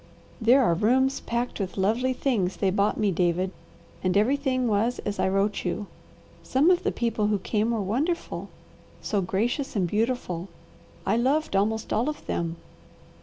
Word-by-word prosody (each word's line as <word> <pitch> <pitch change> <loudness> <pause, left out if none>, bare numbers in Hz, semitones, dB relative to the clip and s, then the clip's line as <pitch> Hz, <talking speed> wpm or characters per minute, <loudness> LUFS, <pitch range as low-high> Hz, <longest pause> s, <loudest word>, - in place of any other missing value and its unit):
"There 250 +4 +5
are 170 - +3
rooms 260 +9 +2
packed 235 0 -3
with 190 -2 -3
the 195 - -2
lovely 230 +6 +2
things 225 -9 0
they 195 -2 +1
bought 200 +2 +1
me, 210 -3 +2
David, 180 +1 +1 0.5
and 185 +1 +2
everything 255 +2 +1
was 225 +3 +1
as 205 -1 -3
I - - +2
wrote 195 +1 0
you. 190 +3 -2 0.6
Some 290 +7 +3
of 360 - +3
the - - 0
people 225 -3 0
who 210 -1 +2
came 210 +3 0
were 230 -2 0
wonderful, 285 - -2 0.5
so 205 -2 0
gracious 235 +10 -1
and 185 -4 +1
beautiful, 210 -4 -1 0.6
I 210 +4 +2
loved 270 +1 +1
almost 220 +3 0
all 235 +7 +1
of 305 - -7
them. 165 -1 -2
215 Hz, 170 wpm, -26 LUFS, 195-250 Hz, 0.6 s, There